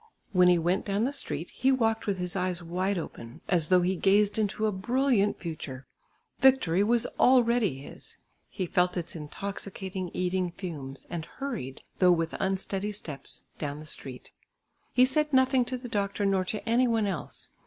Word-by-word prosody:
When 180 Hz, -3 st, +5 dB
he 180 Hz, -1 st, +6 dB
went 175 Hz, +4 st, +1 dB
down 200 Hz, +1 st, 0 dB
the 270 Hz, +4 st, 0 dB
street, 280 Hz, -, -3 dB
he 265 Hz, -, +2 dB
walked 225 Hz, -4 st, +1 dB
with 200 Hz, -2 st, 0 dB
his 180 Hz, 0 st, -2 dB
eyes 180 Hz, -2 st, -1 dB
wide 185 Hz, +4 st, -1 dB
open, 120 Hz, -7 st, -7 dB
as 170 Hz, -4 st, +2 dB
though 180 Hz, -1 st, +5 dB
he 185 Hz, +2 st, +1 dB
gazed 205 Hz, +3 st, +3 dB
into 215 Hz, 0 st, 0 dB
a 215 Hz, -, +2 dB
brilliant 230 Hz, +1 st, +1 dB
future; 145 Hz, -6 st, -6 dB, 0.5 s
victory 255 Hz, -9 st, +4 dB
was 235 Hz, +2 st, +3 dB
already 235 Hz, -, +4 dB
his; -, -, -11 dB, 0.3 s
he 185 Hz, -, -3 dB
felt 180 Hz, +1 st, +1 dB
its 170 Hz, 0 st, -5 dB
intoxicating 190 Hz, +3 st, -5 dB
eating 180 Hz, -1 st, -1 dB
fumes, 145 Hz, -8 st, -7 dB
and 170 Hz, -2 st, -4 dB
hurried, 235 Hz, -, -6 dB, 0.2 s
though 180 Hz, -, +6 dB
with 165 Hz, -1 st, +1 dB
unsteady 195 Hz, +1 st, -1 dB
steps, 160 Hz, -9 st, -8 dB, 0.2 s
down 145 Hz, -1 st, -3 dB
the 155 Hz, -, -10 dB
street. 135 Hz, -4 st, -6 dB, 0.6 s
He 255 Hz, -, +5 dB
said 300 Hz, +3 st, +1 dB
nothing 260 Hz, -1 st, +4 dB
to 255 Hz, +1 st, -3 dB
the 245 Hz, 0 st, -8 dB
doctor 200 Hz, -2 st, -1 dB
nor 195 Hz, -1 st, +2 dB
to 215 Hz, +4 st, -4 dB
any 240 Hz, +3 st, +3 dB
one 225 Hz, -2 st, +1 dB
else. 190 Hz, -5 st, -5 dB
195 Hz, 175 wpm, -28 LUFS, 175-225 Hz, 0.6 s, he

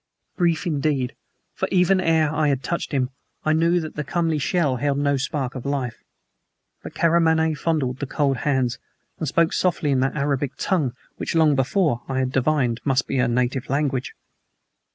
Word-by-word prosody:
Brief, 170 Hz, -1 st, +1 dB
indeed, 145 Hz, -5 st, 0 dB, 0.4 s
for -, -, -2 dB
even 185 Hz, +1 st, +3 dB
ere 160 Hz, -3 st, +2 dB
I 155 Hz, -1 st, +1 dB
had 135 Hz, -2 st, 0 dB
touched 170 Hz, +6 st, -3 dB
him 130 Hz, -3 st, 0 dB, 0.3 s
I 155 Hz, -, +3 dB
knew 165 Hz, +2 st, +3 dB
that 155 Hz, -, -7 dB
the 150 Hz, -, -2 dB
comely 165 Hz, +2 st, 0 dB
shell 145 Hz, -3 st, +1 dB
held 140 Hz, +2 st, 0 dB
no 140 Hz, 0 st, +2 dB
spark 135 Hz, -1 st, -2 dB
of 130 Hz, -, -6 dB
life. 135 Hz, -4 st, -3 dB, 0.8 s
But -, -, -9 dB
Karamaneh 160 Hz, -1 st, +3 dB
fondled 145 Hz, -6 st, -1 dB
the 140 Hz, -, -3 dB
cold 140 Hz, -1 st, 0 dB
hands, 130 Hz, -1 st, 0 dB, 0.4 s
and 160 Hz, -, -2 dB
spoke 165 Hz, +4 st, +2 dB
softly 170 Hz, -5 st, +1 dB
in 135 Hz, -, +2 dB
that 135 Hz, +1 st, 0 dB
Arabic 140 Hz, -1 st, -1 dB
tongue 155 Hz, -11 st, 0 dB, 0.2 s
which -, -, -3 dB
long 160 Hz, -2 st, +5 dB
before 135 Hz, -, +1 dB
I 135 Hz, -, -1 dB
had 130 Hz, -1 st, 0 dB
divined 130 Hz, -3 st, +1 dB
must 135 Hz, -1 st, +1 dB
be 135 Hz, -, -2 dB
her 125 Hz, 0 st, +3 dB
native 125 Hz, +2 st, -1 dB
language. 135 Hz, -2 st, -1 dB
145 Hz, 175 wpm, -23 LUFS, 130-160 Hz, 0.8 s, long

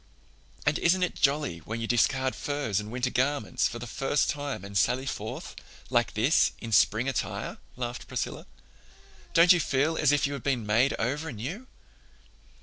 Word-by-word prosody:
"And 150 Hz, +1 st, +2 dB
isn't 180 Hz, +2 st, +3 dB
it 180 Hz, -, 0 dB
jolly 140 Hz, -, +1 dB
when 110 Hz, +8 st, -5 dB
you 115 Hz, -, -2 dB
discard 130 Hz, +3 st, +2 dB
furs 145 Hz, -9 st, -1 dB
and 105 Hz, 0 st, -6 dB
winter 125 Hz, +2 st, -2 dB
garments 130 Hz, -5 st, +1 dB
for 120 Hz, -, -6 dB
the 120 Hz, -, -6 dB
first 135 Hz, +5 st, 0 dB
time 145 Hz, -9 st, -5 dB
and 100 Hz, 0 st, -9 dB
sally 125 Hz, +6 st, +2 dB
forth, 110 Hz, -5 st, -5 dB, 0.4 s
like 120 Hz, -3 st, +1 dB
this, 125 Hz, +9 st, +3 dB
in 115 Hz, -, -7 dB
spring 110 Hz, +4 st, +3 dB
attire?" 135 Hz, -, -3 dB, 0.2 s
laughed 120 Hz, 0 st, -5 dB
Priscilla. 125 Hz, -2 st, -4 dB, 0.9 s
"Don't 170 Hz, +2 st, +8 dB
you 175 Hz, -, +2 dB
feel 150 Hz, +2 st, +1 dB
as 150 Hz, -2 st, +3 dB
if 145 Hz, -, +2 dB
you 140 Hz, -, -2 dB
had 140 Hz, -, -5 dB
been 125 Hz, -5 st, -1 dB
made 115 Hz, +6 st, +3 dB
over 145 Hz, +7 st, -2 dB
new?" 150 Hz, -, -6 dB
130 Hz, 170 wpm, -28 LUFS, 115-145 Hz, 0.9 s, Don't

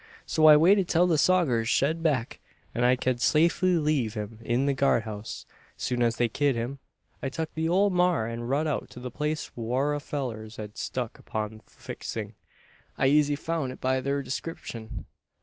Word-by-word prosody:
So 155 Hz, 0 st, +4 dB
I 150 Hz, -1 st, +10 dB
waited 185 Hz, +4 st, +5 dB
till 175 Hz, +1 st, +3 dB
the 165 Hz, -4 st, +2 dB
sogers 140 Hz, -11 st, +3 dB
shed 150 Hz, +6 st, +2 dB
get -, -, -10 dB
back, 135 Hz, -7 st, 0 dB, 0.3 s
an 120 Hz, -, 0 dB
I 125 Hz, +1 st, +5 dB
ked 125 Hz, -1 st, -1 dB
safely 170 Hz, +4 st, +3 dB
leave 145 Hz, -8 st, 0 dB
him 105 Hz, +1 st, -6 dB
in 120 Hz, +4 st, 0 dB
the 140 Hz, -, +2 dB
guard 135 Hz, -4 st, +2 dB
house. 110 Hz, 0 st, -7 dB, 0.3 s
Soon 125 Hz, -1 st, -2 dB
as 115 Hz, -1 st, +2 dB
they 120 Hz, -, +2 dB
kim 140 Hz, +2 st, +1 dB
in, 125 Hz, +4 st, -4 dB, 0.4 s
I 135 Hz, -, -2 dB
tuk 160 Hz, +3 st, -4 dB
the 160 Hz, 0 st, -1 dB
ole 195 Hz, +3 st, +3 dB
maar 180 Hz, -9 st, +2 dB
and 115 Hz, +1 st, -5 dB
rud 145 Hz, +4 st, +1 dB
out 150 Hz, -3 st, -2 dB
to -, -, -11 dB
the 125 Hz, 0 st, -6 dB
place 150 Hz, +4 st, -3 dB
whar 125 Hz, +5 st, 0 dB
our 145 Hz, -, -1 dB
fellurs 120 Hz, -7 st, -5 dB
had 105 Hz, -2 st, -8 dB
struck 125 Hz, -3 st, -4 dB
upon 110 Hz, 0 st, -4 dB
the 110 Hz, -, -19 dB
fixing. -, -, -7 dB, 0.6 s
I 135 Hz, -, +3 dB
eezy 145 Hz, 0 st, +3 dB
foun' 160 Hz, -3 st, -2 dB
it -, -, -10 dB
by 130 Hz, 0 st, +1 dB
thur 140 Hz, +1 st, -1 dB
descripshun. 125 Hz, -4 st, -6 dB
135 Hz, 195 wpm, -27 LUFS, 120-155 Hz, 0.6 s, I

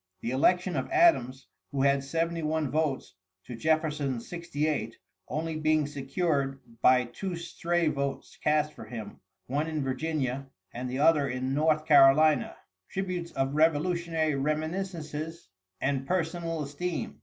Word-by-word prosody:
The 115 Hz, -, -2 dB
election 180 Hz, +7 st, +2 dB
of 130 Hz, -, -2 dB
Adams, 130 Hz, -, +3 dB, 0.3 s
who 135 Hz, -2 st, 0 dB
had 140 Hz, 0 st, +3 dB
71 160 Hz, -1 st, -1 dB
votes 150 Hz, -7 st, -1 dB, 0.3 s
to 125 Hz, -, -7 dB
Jefferson's 150 Hz, -3 st, 0 dB
68, 150 Hz, -8 st, -2 dB, 0.3 s
only 160 Hz, +1 st, -2 dB
being 155 Hz, -1 st, +2 dB
secured 140 Hz, -1 st, -1 dB, 0.2 s
by 125 Hz, 0 st, +6 dB
two 175 Hz, +10 st, -5 dB
stray 170 Hz, 0 st, -1 dB
votes 140 Hz, -2 st, -3 dB
cast 150 Hz, 0 st, +2 dB
for -, -, -10 dB
him, 115 Hz, -4 st, -8 dB, 0.3 s
one 145 Hz, +5 st, -1 dB
in 155 Hz, -3 st, -2 dB
Virginia, 135 Hz, -1 st, -2 dB, 0.3 s
and 125 Hz, +1 st, -4 dB
the 130 Hz, -, -3 dB
other 150 Hz, -1 st, +4 dB
in 130 Hz, +1 st, -2 dB
North 155 Hz, +1 st, +2 dB
Carolina, 145 Hz, 0 st, +5 dB, 0.3 s
tributes 185 Hz, -3 st, -3 dB
of 135 Hz, +1 st, -1 dB
revolutionary 160 Hz, +1 st, +2 dB
reminiscences 155 Hz, +2 st, -3 dB, 0.3 s
and 135 Hz, -1 st, -1 dB
personal 165 Hz, -2 st, -1 dB
esteem. 160 Hz, +5 st, -4 dB
155 Hz, 130 wpm, -28 LUFS, 135-165 Hz, 0.3 s, by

